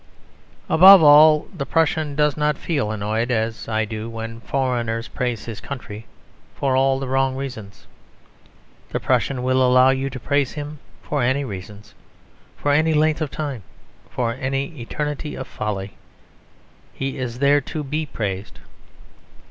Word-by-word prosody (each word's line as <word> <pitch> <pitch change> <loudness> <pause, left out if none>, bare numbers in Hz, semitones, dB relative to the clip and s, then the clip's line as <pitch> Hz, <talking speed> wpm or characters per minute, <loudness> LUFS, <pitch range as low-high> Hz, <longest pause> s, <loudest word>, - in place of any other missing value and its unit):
Above 190 +1 +8
all, 150 +1 +7
the 145 - -3
Prussian 155 -1 0
does 150 -1 +2
not 150 -1 0
feel 140 -10 -2
annoyed, 110 +3 -2
as 110 -2 -2
I 110 -1 0
do, 110 +1 -6
when 115 0 -7
foreigners 115 -1 -2
praise 125 -3 -3
his 115 -3 -7
country 115 -5 -8 0.5
for 135 -2 0
all 135 0 +3
the 135 0 -4
wrong 135 0 +1
reasons. 125 -7 -7 1.0
The - - -2
Prussian 130 -3 0
will 130 0 +2
allow 130 +1 +5
you 135 +1 -1
to 130 - -7
praise 140 +1 0
him 150 0 -7 0.2
for 145 -2 -2
any 130 +3 +1
reasons, 105 -1 -9 0.6
for 145 - 0
any 155 +2 +3
length 155 +1 +2
of 155 - -1
time, 140 -5 -5 0.5
for 115 -2 -2
any 135 +2 -2
eternity 150 +4 -4
of 130 - -6
folly; 100 -2 -4 1.0
he 135 +1 -5
is 120 -2 -4
there 140 +2 +3
to 150 +2 -5
be 150 +2 -3
praised. 100 -6 -5
130 Hz, 150 wpm, -21 LUFS, 115-145 Hz, 1.0 s, Above